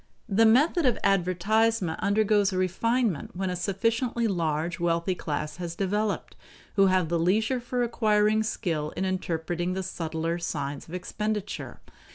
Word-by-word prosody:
The 225 Hz, +1 st, +4 dB
method 295 Hz, +7 st, +4 dB
of 245 Hz, -, +2 dB
advertisement 195 Hz, +1 st, +2 dB
undergoes 205 Hz, 0 st, +3 dB
a 185 Hz, -, -2 dB
refinement 190 Hz, -, 0 dB
when 190 Hz, 0 st, -2 dB
a -, -, -2 dB
sufficiently 230 Hz, +6 st, 0 dB
large 170 Hz, -3 st, -1 dB
wealthy 170 Hz, +2 st, +1 dB
class 150 Hz, -2 st, -4 dB
has 170 Hz, -2 st, -5 dB
developed, 205 Hz, +3 st, -1 dB, 0.4 s
who 195 Hz, -1 st, +5 dB
have 185 Hz, -2 st, +2 dB
the 170 Hz, 0 st, +1 dB
leisure 220 Hz, +9 st, +2 dB
for 245 Hz, 0 st, -2 dB
acquiring 215 Hz, -2 st, +2 dB
skill 165 Hz, -8 st, -2 dB
in 190 Hz, -, 0 dB
interpreting 175 Hz, -1 st, -2 dB
the 190 Hz, 0 st, -3 dB
subtler 165 Hz, -1 st, -3 dB
signs 145 Hz, -4 st, -4 dB
of 170 Hz, -, -7 dB
expenditure. 210 Hz, +2 st, -4 dB
190 Hz, 145 wpm, -27 LUFS, 170-220 Hz, 0.4 s, who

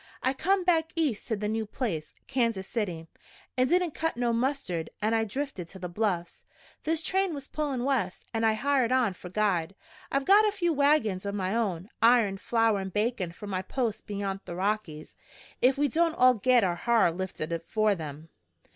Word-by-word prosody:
"I 260 Hz, -, +2 dB
come 380 Hz, +7 st, +1 dB
back 330 Hz, -3 st, +2 dB
East 300 Hz, -10 st, 0 dB
to 225 Hz, -, 0 dB
the 210 Hz, 0 st, -3 dB
new 220 Hz, 0 st, -2 dB
place, 175 Hz, -, -4 dB
Kansas 230 Hz, -7 st, 0 dB
City. 180 Hz, -8 st, -3 dB, 0.5 s
It 255 Hz, 0 st, +3 dB
didn't 355 Hz, 0 st, +2 dB
cut 325 Hz, -5 st, -2 dB
no 240 Hz, -1 st, +1 dB
mustard, 230 Hz, -, -1 dB
an' 215 Hz, +2 st, +1 dB
I 225 Hz, 0 st, +2 dB
drifted 240 Hz, -, -4 dB
to 190 Hz, -, -11 dB
the 180 Hz, -1 st, -5 dB
Bluffs. 175 Hz, -3 st, -2 dB, 0.4 s
This 325 Hz, +1 st, 0 dB
train 380 Hz, -3 st, +1 dB
was 280 Hz, -1 st, -7 dB
pullin' 285 Hz, -5 st, -2 dB
west, 245 Hz, -9 st, -1 dB
an' 225 Hz, 0 st, -1 dB
I 220 Hz, -1 st, +4 dB
hired 260 Hz, +1 st, +1 dB
on 250 Hz, -6 st, +2 dB
for 180 Hz, 0 st, -10 dB
guide. 190 Hz, -3 st, 0 dB, 0.4 s
I've 275 Hz, 0 st, 0 dB
got 415 Hz, +2 st, +6 dB
a -, -, +2 dB
few 350 Hz, -5 st, 0 dB
wagons 280 Hz, -10 st, +2 dB
o' 200 Hz, -, -2 dB
my 195 Hz, 0 st, -2 dB
own 195 Hz, -6 st, -1 dB
iron, 225 Hz, -4 st, +4 dB
flour 225 Hz, -2 st, +2 dB
an' 190 Hz, 0 st, -4 dB
bacon 210 Hz, -3 st, -1 dB
for 180 Hz, -, -10 dB
my 190 Hz, -2 st, -2 dB
post 230 Hz, +2 st, -3 dB
beyant 200 Hz, -2 st, -4 dB
the 170 Hz, -, -6 dB
Rockies 190 Hz, -5 st, -3 dB, 0.4 s
ef 260 Hz, +2 st, +4 dB
we 290 Hz, +1 st, +3 dB
don't 330 Hz, +4 st, +1 dB
all 255 Hz, -3 st, +6 dB
git 250 Hz, 0 st, +3 dB
our 175 Hz, -2 st, 0 dB
ha'r 230 Hz, -4 st, +3 dB
lifted 175 Hz, -2 st, -4 dB
afore 210 Hz, +6 st, +1 dB
then! 155 Hz, -2 st, -7 dB
225 Hz, 190 wpm, -28 LUFS, 190-270 Hz, 0.5 s, got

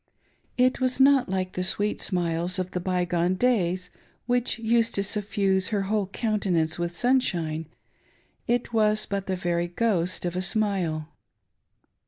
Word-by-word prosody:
It 255 Hz, +1 st, +2 dB
was 255 Hz, 0 st, 0 dB
not 270 Hz, -4 st, +5 dB
like 185 Hz, -1 st, -2 dB
the 180 Hz, -, -2 dB
sweet 205 Hz, +3 st, 0 dB
smiles 175 Hz, 0 st, -1 dB
of 185 Hz, -1 st, -3 dB
the 180 Hz, -, -2 dB
by 180 Hz, 0 st, 0 dB
gone 175 Hz, +1 st, +1 dB
days 185 Hz, -6 st, 0 dB, 0.3 s
which 245 Hz, 0 st, 0 dB
used 230 Hz, 0 st, +1 dB
to 200 Hz, -, 0 dB
suffuse 200 Hz, -2 st, 0 dB
her 205 Hz, -3 st, 0 dB
whole 205 Hz, 0 st, 0 dB
countenance 190 Hz, -7 st, 0 dB
with 170 Hz, 0 st, -1 dB
sunshine 175 Hz, -, 0 dB, 0.4 s
— -, -, -38 dB
it 240 Hz, -1 st, -5 dB
was 215 Hz, -1 st, +2 dB
but 200 Hz, -1 st, -3 dB
the 190 Hz, -, 0 dB
very 175 Hz, -1 st, -1 dB
ghost 180 Hz, -2 st, 0 dB
of 175 Hz, 0 st, -2 dB
a 185 Hz, -, 0 dB
smile. 185 Hz, -7 st, 0 dB
190 Hz, 155 wpm, -26 LUFS, 175-220 Hz, 0.4 s, not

